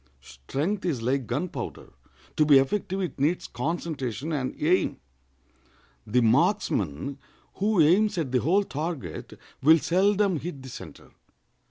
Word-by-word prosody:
Strength 135 - -4
is 155 -10 -1
like 130 0 0
gunpowder: 145 +9 -4 0.4
to 155 - +4
be 145 -2 +7
effective 190 +7 0
it 175 -8 -4
needs 155 +6 +1
concentration 145 -2 -3
and 135 -4 -3
aim. 170 +5 +2 1.1
The 125 +4 +2
marksman 110 - +1 0.4
who 205 0 +1
aims 190 +6 +4
at 155 -7 -2
the 125 - +3
whole 185 - +2
target 150 - -5 0.2
will 160 +4 +7
seldom 195 +3 +2
hit 145 -5 -7
the 130 - -9
center. - - -11
155 Hz, 130 wpm, -26 LUFS, 130-180 Hz, 1.1 s, be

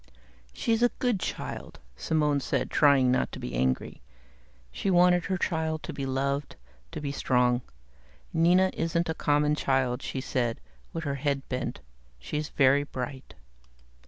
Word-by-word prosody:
"She's 230 -2 0
a 245 - +5
good 245 -6 +1
child," - - -5 0.2
Simone 150 -3 +1
said, 135 - -2
trying 140 -4 +5
not 130 - +1
to - - -6
be - - -5
angry. 65 +1 -1 0.7
She 195 - -2
wanted 180 -1 +4
her 190 -1 -1
child 160 -2 -1
to 165 - -5
be 140 -1 -4
loved, 140 +2 -1 0.4
to 165 - -5
be 145 -2 -3
strong. 125 -3 +2 0.7
"Nina 175 +3 +4
isn't 165 +1 -1
a - - +1
common 150 -1 +2
child," 130 -3 0
she 135 - -4
said, 120 -3 -1 0.3
with 165 - -4
her 140 -2 -1
head 140 -2 -1
bent. 125 -1 -3 0.4
"She's 150 0 -4
very 135 0 +4
bright." 130 -2 -6
145 Hz, 150 wpm, -28 LUFS, 130-165 Hz, 0.7 s, a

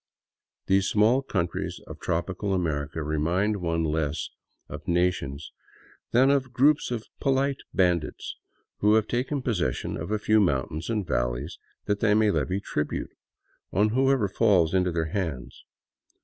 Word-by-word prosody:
These 95 0 +3
small 110 +5 +4
countries 90 -10 -3
of - - -10
tropical 95 +4 -1
America 80 -3 -2
remind 85 +8 0
one 85 -3 -1
less 75 -2 -1 0.4
of - - -9
na 90 +1 +3
tions 70 -2 -7 0.6
than 130 +3 +4
of 130 -3 +1
groups 140 +4 +3
of 120 -3 -3
polite 135 0 +1
bandits 90 -4 0 0.4
who 105 +1 +4
have 110 -1 +2
taken 130 +3 -1
possession 90 - -1
of 80 - -5
a 110 - +1
few 110 +1 +3
mountains 80 - 0
and 105 -4 -1
valleys - - -2 0.3
that 105 0 0
they 105 -1 +3
may 110 -1 +4
levy 95 0 0
tribute 75 -6 -3 0.6
on 105 +4 +3
whoever 130 -1 +2
falls 90 -4 +3
into 90 -1 +2
their 80 -1 -1
hands. 80 -9 -4
95 Hz, 145 wpm, -26 LUFS, 80-110 Hz, 0.6 s, small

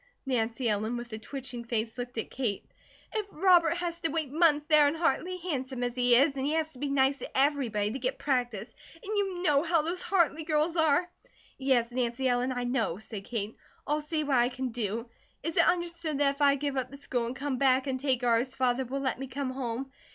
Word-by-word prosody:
Nancy 240 -1 0
Ellen, 220 +2 0
with 240 -1 -7
a 220 - -4
twitching 250 0 -7
face, 230 -1 -2
looked 245 -1 -6
at 225 - -3
Kate. 235 -7 -2 0.5
"If 430 -2 -2
Robert 345 -1 +4
has 345 -1 -3
to 325 - 0
wait 315 -5 -2
months, 300 -2 +4
there 305 -2 +6
in 290 - 0
Hartley, 350 +2 0
handsome 265 -8 -3
as 245 -1 -1
he 245 -1 +4
is, 275 +3 +4
and 265 - -3
he 290 +3 0
has 315 0 -1
to 255 - -13
be 285 +1 -2
nice 275 0 +2
to - - -6
everybody 255 -7 +2
to 265 - -4
get 260 +2 -2
practice, 245 -6 -1 0.2
and 395 +6 -5
you 385 -3 -1
know 290 -5 +4
how 330 -1 +2
those 345 +3 -2
Hartley 330 -5 +1
girls 310 +1 +1
are 320 +1 +3 0.3
" - - -27
"Yes, 255 -3 +2
Nancy 245 +1 -1
Ellen, 250 +1 +1
I 245 -1 -2
know," 240 -8 0
said 205 -1 -8
Kate. 220 -2 -4 0.3
"I'll 300 +1 0
see 310 +1 -1
what 280 -3 +2
I 240 0 +4
can 260 0 -3
do. 230 0 -3 0.4
Is 325 +1 -3
it - - +5
understood 340 -3 0
that 280 -1 +3
if 280 - -11
I 280 -1 +5
give 285 -1 -2
up 260 0 -1
the 280 - -10
school 245 -4 -2
and 245 - -5
come 275 -1 -3
back 265 -1 +3
and 265 -2 -2
take 260 -2 0
ours, 240 +2 +2
Father 255 0 +1
will 270 +3 -3
let 260 -2 -1
me 270 - -4
come 260 +1 -3
home?" 260 0 -4
270 Hz, 230 wpm, -29 LUFS, 245-305 Hz, 0.5 s, there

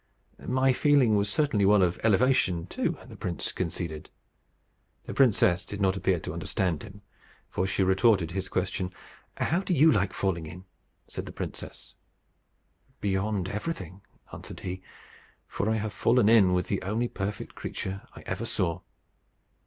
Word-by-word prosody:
"My 130 +1 +3
feeling 135 -5 +4
was 100 0 +1
certainly 140 -5 +1
one 100 0 +5
of 90 -1 0
elevation 110 -5 +3
too," - - -2
the - - -11
prince 85 -2 -3
conceded. 85 -3 -4 0.9
The - - -6
princess 95 -9 +4
did 100 - -7
not 95 -1 +2
appear 95 -1 +1
to - - -5
understand 90 -6 -1
him, 100 -1 -12 0.5
for 95 - 0
she 95 - +1
retorted 95 -2 +3
his 95 +1 -3
question: 90 0 -2 0.5
"How 170 - +1
do 190 -2 -1
you 155 +3 +6
like 100 -3 +1
falling 85 -5 -2
in?" 90 +4 -10 0.4
said - - -6
the - - -6
princess. - - -8 1.1
"Beyond 100 -1 -1
everything," 100 - -5 0.3
answered - - -9
he; 95 0 -5 0.6
"for 100 - -2
I 110 - +2
have 110 -2 -3
fallen 115 +3 +3
in 105 -5 +6
with 90 0 +1
the 100 - -1
only 110 +5 -1
perfect 100 -2 -5
creature 95 +1 -5
I - - -10
ever - - -4
saw." 90 0 -1
95 Hz, 155 wpm, -28 LUFS, 90-110 Hz, 1.1 s, you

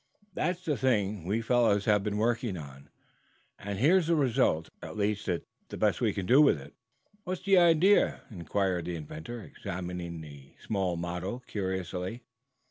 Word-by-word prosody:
That's 180 +2 -2
the 150 -4 0
thing 105 -7 0
we 110 +5 -1
fellows 110 -4 +3
have 105 -2 +3
been 105 -1 -2
working 115 -2 0
on, 70 -2 -11 0.7
and 100 0 -4
here's 160 - +4
the 170 - +3
result. 125 - +2
At - - -8
least, 105 0 -1
it's 90 -2 -1 0.2
the - - -6
best - - +1
we - - +3
can 95 - -4
do 130 +9 +6
with 140 - +5
it." 70 +1 -12 0.5
"What's 185 0 -4
the 195 -1 +5
idea?" 175 +4 +4
inquired 90 -2 -1
the 90 0 -3
inventor, 80 +9 -7
examining 90 -2 -6
the 70 -3 -13
small 95 -5 -1
model 90 +7 -4
curiously. 95 +2 -4
100 Hz, 160 wpm, -29 LUFS, 90-125 Hz, 0.7 s, do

